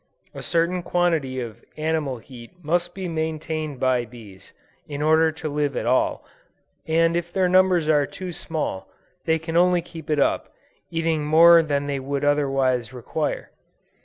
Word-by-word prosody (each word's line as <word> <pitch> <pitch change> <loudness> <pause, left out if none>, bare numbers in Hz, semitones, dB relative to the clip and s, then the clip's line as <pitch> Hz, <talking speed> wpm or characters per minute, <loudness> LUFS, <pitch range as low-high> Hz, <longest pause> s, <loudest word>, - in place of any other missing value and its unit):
A - - -8
certain 170 +1 0
quantity 165 -7 0
of 115 -3 -7
animal 155 -4 -1
heat 120 0 -12
must 175 +3 -1
be 190 -1 -4
maintained 160 -3 -3
by 130 -1 +2
bees, 105 -5 -13 0.4
in 145 -1 -6
order 160 +1 +4
to 160 0 -6
live 145 -2 -1
at - - -2
all, - - +1 0.6
and 165 +1 +2
if 170 0 -2
their 185 0 +2
numbers 185 -3 +3
are 145 -3 +3
too 185 -1 -7
small, 155 - -4 0.4
they 160 -1 +2
can 165 +1 -6
only 175 0 +4
keep 165 -2 -11
it 150 - +1
up, 140 - +1
by - - -30 0.4
eating 165 -2 -1
more 165 +3 +7
than 145 -3 -1
they 140 -1 -2
would 140 +1 -3
otherwise 135 -5 +1
require. 140 +5 -3
155 Hz, 160 wpm, -23 LUFS, 140-165 Hz, 0.6 s, more